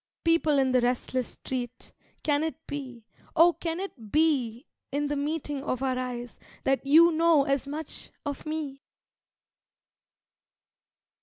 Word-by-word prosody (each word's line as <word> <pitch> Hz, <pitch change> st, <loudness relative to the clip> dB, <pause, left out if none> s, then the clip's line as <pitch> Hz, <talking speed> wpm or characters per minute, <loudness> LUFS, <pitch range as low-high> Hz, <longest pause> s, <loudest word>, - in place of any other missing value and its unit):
People 330 Hz, -3 st, +3 dB
in 265 Hz, -1 st, +3 dB
the 255 Hz, -1 st, +4 dB
restless 250 Hz, 0 st, 0 dB
street, 250 Hz, -1 st, -6 dB, 0.3 s
Can 290 Hz, -1 st, +2 dB
it 320 Hz, -, -2 dB
be, 255 Hz, -6 st, -7 dB, 0.3 s
oh 340 Hz, +2 st, +7 dB
can 330 Hz, +1 st, -3 dB
it 245 Hz, -, -7 dB
be 275 Hz, -6 st, +2 dB, 0.3 s
In 290 Hz, +2 st, 0 dB
the 290 Hz, -, 0 dB
meeting 290 Hz, -1 st, -2 dB
of 255 Hz, -3 st, -2 dB
our 260 Hz, -1 st, +1 dB
eyes 245 Hz, -2 st, -5 dB, 0.2 s
That 270 Hz, 0 st, +1 dB
you 320 Hz, +5 st, +7 dB
know 325 Hz, -2 st, +4 dB
as 275 Hz, -1 st, 0 dB
much 300 Hz, +1 st, -5 dB, 0.2 s
of 285 Hz, -2 st, -4 dB
me? 305 Hz, -3 st, -4 dB
285 Hz, 135 wpm, -28 LUFS, 255-315 Hz, 0.3 s, oh